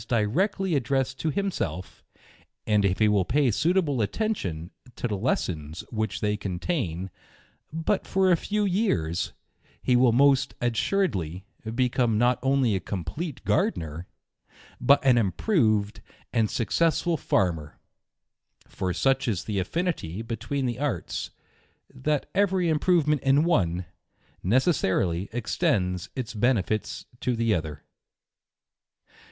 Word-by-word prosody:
directly 175 - +1
addressed 135 -1 0
to 160 - 0
himself; 150 - -3 0.6
ond 105 -2 +3
if 95 -2 +2
he 110 - +4
will 105 -2 +3
pay 135 +5 +2
suitable 155 - +1
attention 100 - -2 0.2
to - - -2
the 105 - -2
lessons 85 - -2
which 110 -3 -2
they 105 0 +1
contain, 95 - -3 0.6
but 165 +5 -1
for 190 -1 +3
a - - +6
few 210 +5 -1
years, 175 - 0 0.5
he 125 - +3
will 125 -1 +5
most 135 +2 +3
assuredly 115 - -1 0.3
become 125 -3 +2
not 120 +2 +3
only 135 -3 +2
a 95 - +1
complete 120 - -5
Gardener, 80 +1 -1 0.7
but 140 +3 +4
an 125 -3 +5
improved 110 - +1 0.3
and 115 -3 +2
successful 165 - +1
farmer; 85 - -1 0.9
foi 95 -2 -3
such 135 +4 +1
is 100 -7 -1
the 105 -3 -2
affinity 110 - -2
between 130 +4 -3
the 120 0 -2
arts, 145 -3 -2 0.6
that 150 +2 -1
every 190 -3 +2
improve 160 0 +2
ment 150 -3 +2
in 135 +3 +4
one, 90 - +1 0.6
necessarily 95 - +1
extends 95 -5 0
its 125 -4 -4
benefits 110 -2 0
to 125 - 0
the 115 -1 +1
other. 80 -5 -3
120 Hz, 120 wpm, -26 LUFS, 95-150 Hz, 0.9 s, a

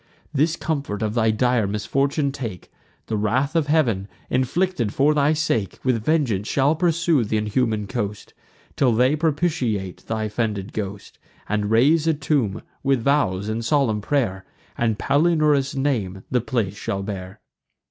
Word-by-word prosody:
This 155 +3 +2
comfort 140 -11 -3
of 105 -1 -1
thy 110 -1 +2
dire 115 -1 +2
misfortune 140 +8 0
take: 115 - -7 0.3
The 110 - -2
wrath 130 +9 0
of 160 -3 +2
Heav'n, 120 -11 +2 0.2
inflicted 130 - 0
for 145 +3 +4
thy 150 +1 +3
sake, 135 -10 -1
With 125 -4 +1
vengeance 120 -9 +1
shall 140 +3 +2
pursue 165 -4 +2
th' 105 - -4
inhuman 110 0 0
coast, 105 -1 -4 0.4
Till 125 -4 +3
they 125 +6 +3
propitiate 145 - -1
thy 110 -1 -2
offended 110 0 -2
ghost, 100 -1 -6 0.3
And 105 0 -1
raise 145 +8 +4
a 160 - +3
tomb, 140 -8 -1 0.2
with 135 -3 +1
vows 105 -9 +1
and 110 +2 -2
solemn 120 -4 +1
pray'r; 105 -7 -1 0.3
And 115 -3 0
Palinurus' 145 -1 +2
name 110 -9 -1
the 125 -2 +2
place 110 -5 -1
shall 100 -1 -3
bear." 95 -2 -6
125 Hz, 145 wpm, -23 LUFS, 105-145 Hz, 0.4 s, for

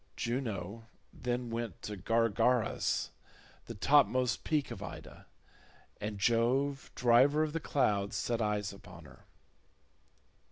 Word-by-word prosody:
Juno 115 -3 -3 0.3
then 120 -1 -3
went 115 -5 -4
to 105 - -5
Gargarus, 115 +3 +1 0.6
the 115 - -6
topmost 130 +1 +3
peak 150 -3 0
of - - -7
Ida, - - -9 0.7
and 105 0 -4
Jove, 125 +6 +1
driver 130 +5 +4
of 155 -1 -3
the 165 - -1
clouds, 105 -10 0
set 120 -1 -1
eyes 105 -1 -1
upon 85 -4 -13
her. - - -17
115 Hz, 115 wpm, -32 LUFS, 105-130 Hz, 0.7 s, driver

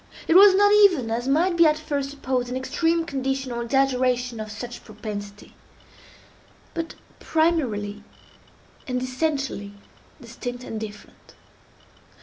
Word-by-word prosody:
It - - +3
was 385 +1 +8
not 410 +1 +5
even, 360 - +5
as 240 +3 -2
might 335 +6 +2
be 335 -1 +6
at 305 0 +2
first 285 -3 -3
supposed, 260 -3 -2
an 250 - -3
extreme 330 +5 0
condition, 270 -2 -2
or 235 0 -3
exaggeration 250 -1 +1
of 215 0 -6
such 240 +3 -8
propensity, 205 -1 -8 1.2
but 330 -1 -5 0.2
primarily 235 -11 0 0.8
and 250 -1 -1
essentially 260 -6 -2 0.5
distinct 245 +1 -7
and 220 -3 -5
different. 210 -1 -11
260 Hz, 125 wpm, -24 LUFS, 235-315 Hz, 1.2 s, was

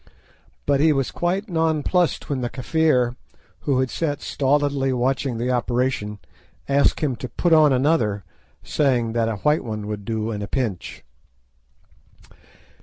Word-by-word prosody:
But 140 -1 +2
he 155 +2 +5
was 135 -3 0
quite 185 +5 -1
nonplussed 165 0 +1
when 135 -3 -2
the 120 - -2
Kafir, 130 -3 +1 0.4
who 135 -3 0
had 130 - -1
sat 145 -3 -2
stolidly 140 -1 +1
watching 130 0 0
the 120 +2 -1
operation, 120 -3 -1 0.5
asked 140 0 +2
him 140 -5 0
to 125 - -6
put 170 +8 +1
on 155 -2 +6
another, 125 -7 +1 0.4
saying 125 -6 +1
that 115 -1 +1
a 110 - -2
"white 150 +9 +1
one" 110 -3 -5
would 105 -1 -5
do 110 +1 -2
at 105 -2 -4
a 100 - -4
pinch. 115 -9 -3
130 Hz, 145 wpm, -22 LUFS, 115-150 Hz, 0.5 s, on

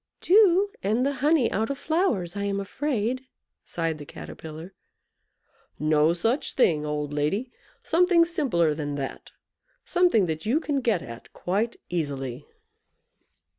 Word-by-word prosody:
"Dew, 400 0 +5
and 220 +6 +1
the 280 - +1
honey 295 -4 +3
out 220 +2 0
of 280 - -2
flowers, 270 - 0
I 200 0 -2
am 200 0 -1
afraid," 255 +3 -2 0.4
sighed 165 -2 -3
the 145 - -8
Caterpillar. 160 +4 -9 1.0
"No 155 +1 +3
such 225 - 0
thing, 155 - +2
old 150 -1 -3
lady! 195 - -1 0.3
Something 345 0 +4
simpler 260 - +1
than 145 -1 -4
that. 135 -2 -6 0.6
Something 350 - +3
that 160 -2 -3
you 245 +8 +2
can 290 -4 -1
get 225 -8 +1
at 115 0 -10
quite 210 +6 -1
easily." 140 -5 -4
200 Hz, 130 wpm, -26 LUFS, -, 1.0 s, Dew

